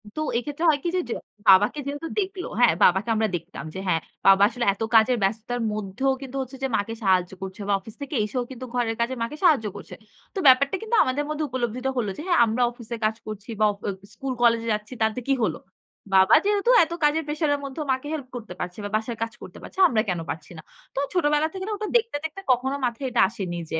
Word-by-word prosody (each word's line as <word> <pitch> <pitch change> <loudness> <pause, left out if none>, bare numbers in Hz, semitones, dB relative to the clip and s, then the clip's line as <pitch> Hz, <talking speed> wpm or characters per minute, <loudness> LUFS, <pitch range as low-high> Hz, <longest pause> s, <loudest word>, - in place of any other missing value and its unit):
তো 310 - -2 0.2
এক্ষেত্রে 290 +6 -4
হয় 295 -2 +3
কি 345 - 0
যে, - - +2
য - - -3 0.4
বাবাকে 205 +9 +6
যেহেতু 290 +3 -4
দেখল, 380 -2 -3 0.2
হ্যা, 245 - +7 0.2
বাবাকে 190 +6 +4
আমরা 220 0 +2
দেখতাম 170 +1 -7
যে - - -5
হ্যা, 180 - +3 0.3
বাবা 195 0 +7
আসলে 240 0 -3
এত 195 - -17
কাজের 235 +3 +5
ব্যস্ততার 225 +5 -1
মধ্যেও 210 +6 -1
কিন্তু 270 -1 -8
হচ্ছে 265 +1 -7
যে - - +2
মাকে 205 +3 -3
সাহায্য 185 -2 +2
করছে। 190 +1 -7
বা 205 - +2
অফিস 210 +3 -13
থেকে 280 +1 -5
এসেও 245 +4 -2
কিন্তু 255 0 -7
ঘরের 235 -2 0
কাজে 235 +3 0
মাকে 290 +6 -5
সাহায্য 300 -11 +4
করছে। 200 - -9 0.4
তো - - -1
ব্যাপারটা 270 +5 +6
কিন্তু 445 +1 -1
আমাদের 260 +3 -1
মধ্যে 305 0 -2
উপলব্ধিত 250 0 -2
হল 235 -4 0
যে - - -5
হ্যা, 355 - +3
আমরা 225 +2 -1
অফিসে 235 -1 -7
কাজ 215 0 +1
করছি 215 +1 -7
বা - - +6 0.2
অ - - +1 0.2
স্কুল 270 -2 -4
কলেজে 230 -1 +3
যাচ্ছি 210 +3 -5
তাতে 220 +2 +1
কি 275 - +3
হল? 170 -7 +1 0.6
বাবা 190 +2 +7
যেহেতু 415 +3 +2
এত 325 - -5
কাজের 300 +2 +3
প্রেশার 300 +1 -1
এর - - -6
মধ্যেও 275 +3 -5
মাকে 260 +2 -2
হেল্প 285 -5 -4
করতে 220 -6 -7
পারছে 180 0 -5
বা 205 - -4
বাসায় 225 +2 -2
কাজ 225 - -5
করতে - - -10
পারছে - - -10
আমরা 225 -8 +2
কেন 180 -2 -1
পারছি 155 +1 -6
না? - - -8 0.3
তো - - 0
ছোটবেলা 300 -3 +2
থেকে 380 -1 -5
ওটা 425 +1 -4
দেখতে, 460 -7 -2
দেখতে, 320 +5 -5
কখনো 260 +2 +1
মাথায় 245 +3 -2
এটা - - +2
আসেনি 185 -6 -5
যে 160 - 0
245 Hz, 225 wpm, -24 LUFS, 210-290 Hz, 0.6 s, হ্যা